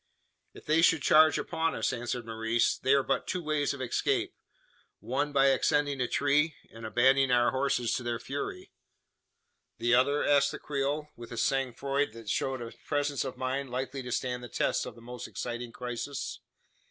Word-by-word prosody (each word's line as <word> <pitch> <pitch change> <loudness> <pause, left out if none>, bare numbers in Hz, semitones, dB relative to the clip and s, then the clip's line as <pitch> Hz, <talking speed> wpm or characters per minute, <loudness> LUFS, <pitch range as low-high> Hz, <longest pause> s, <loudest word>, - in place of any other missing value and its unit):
"If - - -13
they 160 +2 +3
should 165 -3 +4
charge 155 0 +6
upon 160 0 -1
us," - - 0
answered 120 -1 -3
Maurice, 115 +1 +1
"there 140 +1 +3
are - - -8
but 135 - -1
two 180 -2 -2
ways 150 -2 0
of 140 -2 -5
escape. 125 - 0 0.7
One, 140 +4 -1
by 135 -1 +4
ascending 140 +1 +1
a 125 - +1
tree, 145 +3 +2 0.2
and 115 0 -7
abandoning 130 +4 +4
our 120 -1 +4
horses 130 -3 0
to 125 - -1
their 120 -1 -2
fury." 390 - -5 1.1
"The 120 0 +1
other?" 140 +4 +3
asked 140 -1 +4
the - - -4
Creole, 145 +1 -2
with 120 0 -11
a 115 - -6
sang 135 0 0
froid 140 -1 -1
that 115 -2 -9
showed 130 +2 -1
a 115 - -8
presence 145 -2 0
of 130 - -6
mind 130 +1 -2
likely 130 +2 -3
to 125 -1 -7
stand 125 0 -2
the 120 - -8
test - - 0
of - - -8
the 115 - -15
most 125 +1 -7
exciting 120 0 -5
crisis. 125 +3 -5
135 Hz, 185 wpm, -29 LUFS, 120-145 Hz, 1.1 s, charge